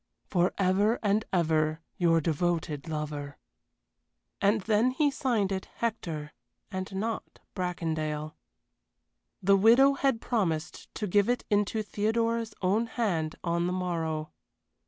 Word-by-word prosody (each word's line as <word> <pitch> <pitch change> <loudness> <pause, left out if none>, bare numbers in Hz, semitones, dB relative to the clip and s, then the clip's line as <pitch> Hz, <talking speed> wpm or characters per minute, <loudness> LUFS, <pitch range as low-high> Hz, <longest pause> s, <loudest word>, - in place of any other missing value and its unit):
For 180 -1 +2
ever 200 +4 +3
and 205 +1 +2
ever 155 -3 +1 0.2
your 165 -2 +4
devoted 165 -1 -1
lover." 150 -2 -4 1.0
And 205 +2 +3
then 220 +4 +3
he 290 +3 +2
signed 235 -8 0
it 190 -1 -3
"Hector," 165 -10 -3 0.4
and 190 0 -4
not 220 +3 -3 0.2
"Bracondale." 155 -4 -2 1.1
The 200 +2 +6
widow 240 +7 +6
had 270 -4 +1
promised 175 -11 -2
to 215 - -2
give 205 +3 +3
it 245 - 0
into 210 +1 +1
Theodora's 225 +2 -1
own 210 +6 +2
hand 175 -10 -1
on 170 0 0
the 180 - -1
morrow. 165 -4 -2
190 Hz, 120 wpm, -29 LUFS, 160-220 Hz, 1.1 s, The